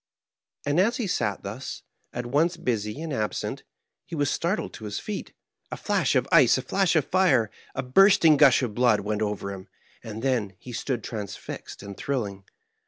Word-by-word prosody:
And 145 Hz, +3 st, +2 dB
as 225 Hz, +5 st, +3 dB
he 235 Hz, -, -1 dB
sat 105 Hz, -, -1 dB
thus, 110 Hz, +7 st, -6 dB, 0.3 s
at 120 Hz, 0 st, -4 dB
once 160 Hz, +8 st, +1 dB
busy 115 Hz, -1 st, -2 dB
and 160 Hz, -3 st, -4 dB
absent, 110 Hz, -4 st, -2 dB, 0.4 s
he 170 Hz, -, -8 dB
was 145 Hz, -2 st, +1 dB
startled 180 Hz, +6 st, -1 dB
to 110 Hz, -, -9 dB
his 105 Hz, -1 st, -4 dB
feet. 210 Hz, -2 st, -5 dB, 0.4 s
A -, -, -4 dB
flash -, -, +1 dB
of -, -, +2 dB
ice, -, -, +6 dB
a -, -, -3 dB
flash 195 Hz, -4 st, +1 dB
of 155 Hz, -4 st, +3 dB
flre, 145 Hz, -, +4 dB, 0.3 s
a -, -, -2 dB
bursting 165 Hz, +3 st, +6 dB
gush 135 Hz, -3 st, +6 dB
of 115 Hz, -4 st, -2 dB
blood, 120 Hz, -2 st, +3 dB
went 105 Hz, +1 st, -2 dB
over 105 Hz, -2 st, -2 dB
him, 95 Hz, -1 st, -10 dB, 0.4 s
and 110 Hz, +1 st, -7 dB
then 115 Hz, -8 st, 0 dB
he 125 Hz, +3 st, -10 dB
stood 120 Hz, -1 st, -2 dB
transfixed 105 Hz, -2 st, -7 dB
and 100 Hz, -1 st, -8 dB
thrilling. 100 Hz, -8 st, -3 dB
125 Hz, 180 wpm, -26 LUFS, 105-160 Hz, 0.4 s, ice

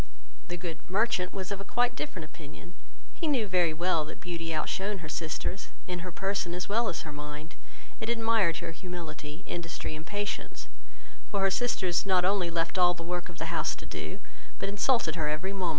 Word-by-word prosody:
The 175 Hz, -, -3 dB
good 165 Hz, -2 st, -4 dB
merchant 195 Hz, -2 st, +3 dB
was 190 Hz, 0 st, -4 dB
of 200 Hz, -1 st, -2 dB
a -, -, -3 dB
quite 245 Hz, +4 st, +3 dB
different 185 Hz, -, -3 dB
opinion; 155 Hz, +2 st, -11 dB, 0.4 s
he 330 Hz, -, -1 dB
knew 260 Hz, -7 st, +4 dB
very 180 Hz, -4 st, +4 dB
well 165 Hz, 0 st, +2 dB
that 155 Hz, -, -8 dB
Beauty 165 Hz, -2 st, -3 dB
out 155 Hz, -1 st, +1 dB
shone 200 Hz, +1 st, 0 dB
her -, -, -4 dB
sisters, 170 Hz, +4 st, -1 dB, 0.2 s
in 180 Hz, -1 st, -2 dB
her 180 Hz, +1 st, -4 dB
person 195 Hz, -1 st, 0 dB
as 180 Hz, -, -2 dB
well 230 Hz, +3 st, +3 dB
as 170 Hz, -, -2 dB
her 155 Hz, -, -6 dB
mind, 150 Hz, +2 st, -6 dB, 0.5 s
and 220 Hz, -, -1 dB
admired 225 Hz, -7 st, +4 dB
her -, -, -2 dB
humility, 165 Hz, -2 st, -6 dB
industry, 165 Hz, -2 st, -3 dB
and 155 Hz, -, -6 dB
patience; 205 Hz, -1 st, -2 dB, 0.6 s
for 200 Hz, -2 st, +1 dB
her 195 Hz, 0 st, +5 dB
sisters 190 Hz, -4 st, +2 dB
not 185 Hz, -2 st, +4 dB
only 190 Hz, -2 st, +3 dB
left 165 Hz, +2 st, +1 dB
her -, -, +5 dB
all 175 Hz, 0 st, +7 dB
the 170 Hz, -, -6 dB
work 175 Hz, +1 st, -2 dB
of 170 Hz, -, -10 dB
the -, -, -2 dB
house -, -, +2 dB
to -, -, -9 dB
do, -, -, -4 dB, 0.4 s
but -, -, -1 dB
insulted 205 Hz, -3 st, +3 dB
her 155 Hz, -3 st, +1 dB
every 155 Hz, +6 st, 0 dB
moment. 185 Hz, -3 st, +1 dB
180 Hz, 205 wpm, -31 LUFS, 165-200 Hz, 0.6 s, all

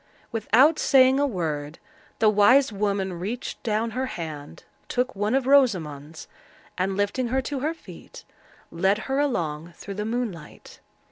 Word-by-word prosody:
Without 250 Hz, +7 st, +3 dB
saying 265 Hz, -1 st, +5 dB
a 285 Hz, -, +2 dB
word, 155 Hz, -, -4 dB, 0.4 s
the 220 Hz, -, +3 dB
wise 215 Hz, +5 st, +5 dB
woman 195 Hz, -3 st, -2 dB
reached 220 Hz, +7 st, -5 dB
down 225 Hz, +1 st, -1 dB
her 260 Hz, +4 st, -2 dB
hand, 155 Hz, -, -7 dB, 0.2 s
took 255 Hz, 0 st, -1 dB
one 210 Hz, +5 st, 0 dB
of 270 Hz, -2 st, +1 dB
Rosamond's, 165 Hz, -, +1 dB, 0.5 s
and, 190 Hz, +1 st, -1 dB
lifting 205 Hz, +5 st, 0 dB
her 260 Hz, +3 st, 0 dB
to 280 Hz, +1 st, -4 dB
her 310 Hz, +5 st, -2 dB
feet, -, -, -13 dB, 0.5 s
led 190 Hz, +4 st, +1 dB
her 270 Hz, +1 st, -1 dB
along 170 Hz, -, -2 dB
through 200 Hz, -, -8 dB
the 210 Hz, +2 st, -4 dB
moonlight. 220 Hz, -9 st, -6 dB
210 Hz, 145 wpm, -25 LUFS, 175-255 Hz, 0.5 s, saying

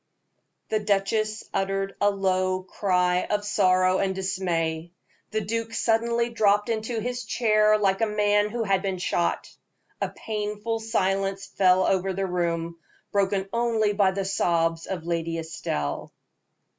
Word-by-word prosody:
The 215 Hz, -, +1 dB
duchess 215 Hz, +1 st, 0 dB
uttered 195 Hz, 0 st, -1 dB
a 205 Hz, -, +5 dB
low 185 Hz, -1 st, 0 dB
cry 180 Hz, -2 st, +1 dB
of 205 Hz, 0 st, -1 dB
sorrow 185 Hz, -2 st, +3 dB
and 190 Hz, -1 st, 0 dB
dismay. 170 Hz, -3 st, -2 dB, 0.4 s
The 215 Hz, 0 st, -1 dB
duke 230 Hz, +2 st, -3 dB
suddenly 235 Hz, +1 st, +1 dB
dropped 210 Hz, -1 st, +2 dB
into 225 Hz, +1 st, -2 dB
his 245 Hz, +2 st, -3 dB
chair 215 Hz, -1 st, +3 dB
like 195 Hz, 0 st, +1 dB
a 225 Hz, -, +3 dB
man 210 Hz, 0 st, +2 dB
who 230 Hz, +1 st, -2 dB
had 195 Hz, -3 st, +1 dB
been 190 Hz, -1 st, -2 dB
shot. 175 Hz, -1 st, -1 dB, 0.5 s
A -, -, 0 dB
painful 210 Hz, +1 st, -3 dB
silence 195 Hz, -3 st, -1 dB
fell 185 Hz, -1 st, +3 dB
over 190 Hz, 0 st, +1 dB
the 195 Hz, +1 st, -1 dB
room, 170 Hz, -2 st, -2 dB, 0.3 s
broken 195 Hz, -1 st, +1 dB
only 230 Hz, -3 st, +1 dB
by 200 Hz, -2 st, +3 dB
the 195 Hz, 0 st, -2 dB
sobs 165 Hz, -3 st, 0 dB
of 180 Hz, -4 st, -4 dB
Lady 165 Hz, -1 st, -2 dB
Estelle. 75 Hz, -, -4 dB
195 Hz, 140 wpm, -25 LUFS, 185-215 Hz, 0.5 s, a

